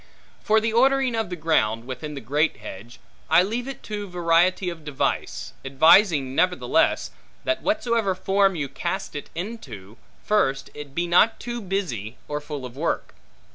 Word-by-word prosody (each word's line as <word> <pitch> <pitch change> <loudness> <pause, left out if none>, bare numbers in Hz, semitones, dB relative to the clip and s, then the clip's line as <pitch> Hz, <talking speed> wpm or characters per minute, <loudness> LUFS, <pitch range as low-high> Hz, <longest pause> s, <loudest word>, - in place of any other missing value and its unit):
For 220 -1 +4
the 220 0 -1
ordering 265 +1 +3
of 225 -4 -1
the 180 - -3
ground, 115 -9 +1
within 135 +4 -6
the 140 - -6
great 145 +7 +1
hedge, 115 +6 -10 0.3
I 165 +3 +6
leave 235 +6 -3
it 275 - -7
to 205 -1 -5
variety 175 +2 +2
of 170 -3 -5
device; 150 -2 -2
advising 140 +1 +4
nevertheless, 180 +5 +2 0.3
that 325 0 0
whatsoever 235 -10 +1
form 195 +1 +2
you 150 -4 -2
cast - - -4
it 145 - -6
into, 130 - -7 0.3
first, 135 -11 +1
it 145 -2 -9
be 175 - 0
not 180 +6 +4
too 240 -1 -5
busy, 160 - -3
or 150 0 -3
full 145 -3 -6
of 125 0 -9
work. 160 +4 -2
170 Hz, 160 wpm, -24 LUFS, 140-210 Hz, 0.3 s, I